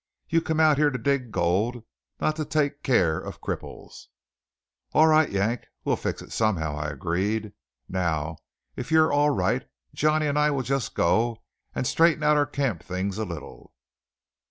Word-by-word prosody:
You 165 0 +2
come 160 -1 -1
out 155 -3 +5
yere 150 -1 +4
to 130 - -3
dig 130 0 0
gold, 105 +8 0 0.4
not 155 - +1
to 155 - -1
take 145 -1 -1
keer 90 - +2
of - - -8
cripples." - - -7 0.9
"All 155 - +6
right, 155 -1 +5
Yank, 105 +5 -1 0.2
we'll - - +2
fix - - -4
it - - -14
somehow," 85 -9 0
I 75 0 -3
agreed. 95 +9 -2 0.3
"Now 80 -4 -2 0.4
if 125 - -6
you're 160 -1 +4
all 145 +1 +4
right, 95 -9 0 0.2
Johnny 155 +1 +2
and 145 0 +1
I 150 0 +4
will 140 -3 -1
just 135 -1 -2
go 115 +6 +1 0.3
and - - -1
straighten 165 +2 +3
out 150 0 +4
our 145 -1 +2
camp 125 - -2
things 95 +1 -3
a 110 - -1
little." 80 -7 -9
120 Hz, 170 wpm, -26 LUFS, 95-150 Hz, 0.9 s, All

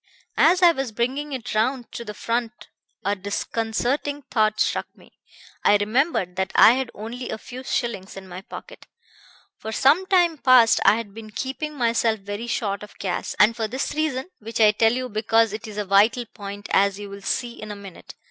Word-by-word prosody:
"As 360 +3 +5
I 345 - +8
was 270 -6 -3
bringing 265 +6 -2
it 250 -3 -5
round 240 +3 0
to - - -6
the 210 -2 -8
front 235 +2 -3 0.4
a 200 +1 +1
disconcerting 230 +8 -2
thought 215 -2 +2
struck - - 0
me. - - -22 0.4
I 205 - +5
remembered 205 - 0
that 190 0 -1
I - - +8
had 260 0 -1
only 235 +4 -6
a - - -3
few 250 +3 -9
shillings 225 -8 -3
in 190 -1 -9
my 180 0 -8
pocket. - - -11 0.7
"For 220 - -6
some 295 - +3
time 350 -5 +3
past 255 -4 +6
I 195 - +7
had 225 -3 -6
been 220 0 -10
keeping 270 +7 -4
myself 230 -3 +1
very 205 +4 -6
short 205 -4 -2
of 210 - -12
cash, 190 -2 -3
and 215 +3 +5
for 225 -2 -2
this 260 +5 -3
reason 305 +1 -2
which 225 +2 -6
I 215 -1 +7
tell 225 +2 +3
you 255 +1 -2
because 225 0 +2
it 220 +2 -6
is 210 -1 -9
a 210 - -2
vital 210 +5 +3
point, 205 -1 -9
as 200 0 +3
you 205 0 -7
will 200 0 -10
see 240 +4 -3
in 215 - -7
a 210 - -5
minute. 200 -3 -12
225 Hz, 195 wpm, -23 LUFS, 205-255 Hz, 0.7 s, I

